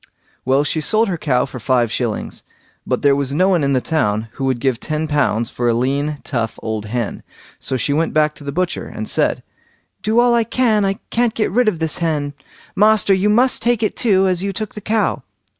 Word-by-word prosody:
Well, 135 +2 +3
she 155 +2 -1
sold 215 +6 +2
her 175 - -2
cow 125 -6 +1
for 130 -1 -9
five 120 -1 +1
shillings, 115 -4 -3 0.5
but - - -1
there 140 -1 +5
was 140 0 -2
no 185 +4 +3
one 175 -5 +2
in 140 0 +1
the 130 - +2
town 110 -9 -1
who 135 - -4
would 130 -2 0
give 125 -2 0
ten 155 0 -3
pounds 115 -6 0
for 120 - -2
a 115 - +2
lean 140 +5 -1
tough 115 -4 -3
old 110 -1 -3
hen, 120 0 -3 0.4
so 130 - -2
she 135 +4 -1
went 160 +3 0
back 155 0 +2
to 150 - -14
the 140 - -4
butcher, 175 +3 -2
and - - -6
said: - - 0 0.6
"Do 220 +2 +2
all 240 0 +4
I 235 -1 +3
can, 225 -3 +1
I 195 - +1 0.2
can't 235 -1 +1
get 215 - 0
rid 245 +3 +2
of 205 -6 +1
this 160 -1 -1
hen, 150 -4 -1 0.4
master! 210 -1 +4
you 190 +2 +2
must 245 +5 +3
take 235 -1 +1
it 215 - 0
too, 195 -5 +3
as 180 -2 0
you 200 +1 -2
took 215 +2 -5
the 210 - -8
cow." 215 +1 0
155 Hz, 225 wpm, -19 LUFS, 130-210 Hz, 0.6 s, there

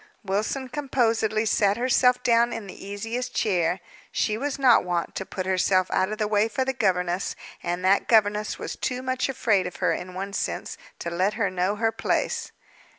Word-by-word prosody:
Wilson 215 +7 -1
composedly 230 -5 0
sat 205 -1 +2
herself 250 0 +3
down 235 0 +4
in 225 - -5
the 195 - -10
easiest 225 +5 -4
chair. 180 -3 +1 0.3
She 215 - 0
was 280 +5 -2
not 260 -4 +5
wont 175 -1 -2
to 190 - -5
put 185 - -4
herself 185 0 +2
out 190 +2 +1
of 215 - -3
the 215 -1 0
way 210 +1 +2
for 260 +3 -1
the 265 - 0
governess; 180 -5 0 0.3
and 175 +1 -2
that 195 +1 +3
governess 210 -2 +3
was - - -5
too 255 0 -3
much 260 +1 -1
afraid 210 -8 +1
of 180 - -8
her, - - +1
in 180 0 -6
one 195 +1 -4
sense, - - -3 0.2
to 170 - -5
let 185 +4 +1
her 210 -4 0
know 185 +2 0
her 225 +1 +1
place. - - -1
210 Hz, 190 wpm, -25 LUFS, 185-235 Hz, 0.3 s, not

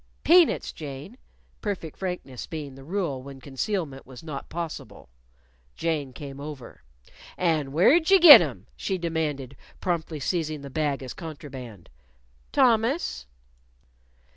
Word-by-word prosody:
"Peanuts, 345 0 +5
Jane," 145 - -8 0.5
perfect 190 -7 -4
frankness 180 -9 -5
being 150 -4 -6
the 135 0 -12
rule 165 -5 -2
when 135 0 -10
concealment 140 +2 -3
was 130 +1 -12
not 150 -4 -7
possible. 170 - -7 0.7
Jane 155 -5 -2
came 140 +1 -9
over. 145 - -9 0.6
"And 155 -6 +1
where'd 275 - +4
you 390 0 +7
git 335 -4 +12
'em?" - - -4
she 190 - -2
demanded, 155 -6 -3 0.2
promptly 165 -3 -2
seizing 155 +1 -2
the 140 -1 -9
bag 145 -2 -1
as 130 - -6
contraband. 135 - -9 0.6
"Thomas." 230 - +2
155 Hz, 120 wpm, -26 LUFS, 135-180 Hz, 0.7 s, git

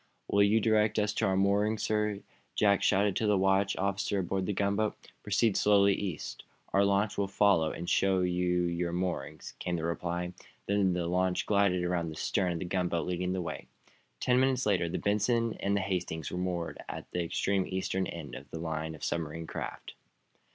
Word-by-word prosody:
"Will 100 - +3
you 100 +2 +5
direct 110 -1 +2
us 105 0 +1
to - - +1
our 95 0 +1
moorings, 105 +3 +2
sir?" 105 -2 0 0.3
Jack 100 -2 +3
shouted 100 0 +2
to 110 - 0
the 105 -1 +3
watch 95 +1 +2
officer 100 +1 -1
aboard 95 0 -1
the - - +1
gunboat. 100 +2 0 0.3
"Proceed 105 +1 +1
slowly 100 -1 +5
east. 95 -6 -5 0.3
Our 100 - +5
launch 100 +1 +1
will 100 - +1
follow 95 -5 +3
and 85 - -6
show 95 0 +2
you 90 0 +1
your 85 0 -1
moorings," 85 -4 -3
came 90 - -2
the 80 - -3
reply. 85 +1 -2 0.3
Then 100 -2 +2
the 90 -1 -1
launch 90 +1 0
glided 100 -3 +2
around 90 -2 -1
the 80 - -7
stern 90 +2 0
of - - -3
the 95 - -4
gunboat, 90 -3 -1
leading 90 0 -1
the 95 -1 -2
way. - - -6 0.5
Ten 125 0 +3
minutes 130 -1 +2
later 95 -5 +1
the - - -2
"Benson" 115 +3 +1
and 100 0 +1
the - - 0
"Hastings" 90 -5 -3
were - - -4
moored, 90 -2 -3
at - - -6
the 90 - -1
extreme 95 +3 0
eastern 95 0 -1
end 80 -4 -7
of 70 - -9
the - - -6
line 80 -1 -3
of 75 - -13
submarine 80 0 -3
craft. - - -6
95 Hz, 195 wpm, -30 LUFS, 85-100 Hz, 0.5 s, you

